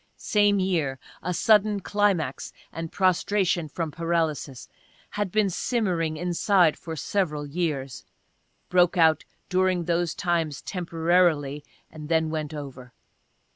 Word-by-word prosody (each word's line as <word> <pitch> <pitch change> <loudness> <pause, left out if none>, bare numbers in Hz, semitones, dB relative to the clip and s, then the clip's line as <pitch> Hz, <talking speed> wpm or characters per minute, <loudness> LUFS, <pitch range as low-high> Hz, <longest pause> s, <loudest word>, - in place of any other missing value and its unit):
Same 205 -1 +2
year, 165 -8 0 0.2
a 180 - -2
sudden 210 +3 +3
climax 195 -9 0 0.2
and 165 -1 -5
prostration 185 -2 +1
from 160 +1 -4
paralysis. 160 -5 -2 0.4
Had 205 -3 -2
been 215 0 +2
simmering 175 -8 -1
inside 175 0 +2
for 165 -2 -7
several 155 -3 -1
years; 145 -4 -3 0.6
broke 180 0 +3
out 160 -2 +4 0.2
during 185 -1 +1
those 170 0 0
times 165 -6 -1
temporarily 165 -5 +1 0.3
and 155 -1 -9
then 160 -1 +1
went 155 -1 -3
over. 135 -4 -8
170 Hz, 115 wpm, -25 LUFS, 155-185 Hz, 0.6 s, out